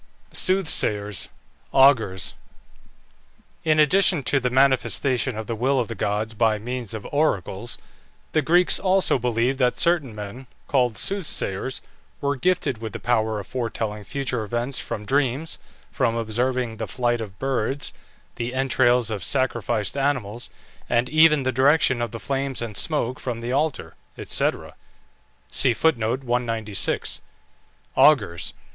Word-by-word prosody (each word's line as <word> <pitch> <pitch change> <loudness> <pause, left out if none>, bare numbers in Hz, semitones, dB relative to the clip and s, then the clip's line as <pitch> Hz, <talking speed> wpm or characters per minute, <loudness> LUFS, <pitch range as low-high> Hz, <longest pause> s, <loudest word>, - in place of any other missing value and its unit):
SOOTHSAYERS 105 - +2 0.5
(AUGURS). 120 -9 +4 1.3
In 155 -2 +2
addition 170 0 +4
to 135 - +2
the 125 -1 0
manifestation 130 -2 +2
of 110 - -4
the 115 - -3
will 130 +4 +1
of 120 - -2
the - - -3
gods 105 +2 -2
by 110 -1 +2
means 120 0 -4
of 105 - -7
oracles, 120 - -1 0.5
the 155 - +2
Greeks 175 +5 +4
also 190 -7 +2
believed 125 +2 0
that 125 -2 +2
certain 160 -10 +2
men, 105 +5 -8 0.2
called 125 -6 +1
soothsayers, 135 - -1 0.4
were 140 0 0
gifted 170 -5 0
with 110 -2 -6
the - - -5
power 110 -3 0
of 100 - -7
foretelling 110 -4 -4
future 130 -1 -3
events 120 +5 -2
from 105 -3 -5
dreams, 140 +5 0 0.3
from 115 - 0
observing 120 +1 -1
the - - -4
flight 120 -2 -1
of 100 -4 -8
birds, 135 +2 -2 0.4
the 120 +2 -3
entrails 125 -3 +2
of 100 -4 -4
sacrificed 120 -5 0
animals, 125 -5 -2 0.4
and 120 +1 +1
even 155 -1 +5
the 130 - +1
direction 130 -1 +3
of 120 - -1
the 115 - -7
flames 135 0 -2
and 115 -3 -5
smoke 130 -2 0
from 120 -3 -4
the 120 +1 -4
altar, 150 +1 -1 0.2
&c. 125 -3 -3 2.2
AUGURS. 85 0 +3
125 Hz, 130 wpm, -23 LUFS, 110-140 Hz, 2.2 s, even